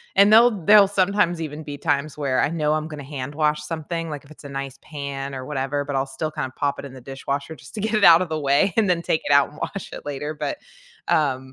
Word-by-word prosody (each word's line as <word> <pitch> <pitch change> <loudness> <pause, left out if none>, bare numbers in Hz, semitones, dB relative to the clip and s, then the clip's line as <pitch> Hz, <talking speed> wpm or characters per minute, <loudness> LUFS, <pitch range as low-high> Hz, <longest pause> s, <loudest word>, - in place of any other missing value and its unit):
and 200 +2 +6
they'll 235 +2 +7
they'll 205 -1 +8
sometimes 190 -3 +1
even 155 0 -5
be 145 -1 -7
times 145 +1 -1
where 140 -3 0
I - - +2
know 155 -2 0
I'm 155 0 -1
gonna 150 -2 -8
hand 135 -1 -6
wash 150 -1 +1
something, 165 0 -4
like 145 - -6
if 140 - -19
it's 155 - -15
a 140 - -8
nice 135 -1 -5
pan 140 -2 -5
or 130 -1 -6
whatever, 145 0 -2
but 140 -1 -4
I'll 135 - +1
still 135 +3 -4
kinda 130 -3 -4
pop 140 -1 -1
it - - -7
in 135 - -10
the 130 - -11
dishwasher 140 +3 -4
just 130 - -15
to 210 - -4
get 220 +1 0
it 215 - +1
out 170 -1 +8
of 185 - -2
the 155 -1 -2
way 140 +6 +3
and 220 - +4
then 175 -2 +2
take 160 - 0
it 145 - +3
out 140 0 +5
and 150 - -16
wash 200 +4 -5
it - - -9
later 145 +1 -4
but, 295 - -4 0.5
uh 150 -6 +2
150 Hz, 265 wpm, -23 LUFS, 140-165 Hz, 0.5 s, they'll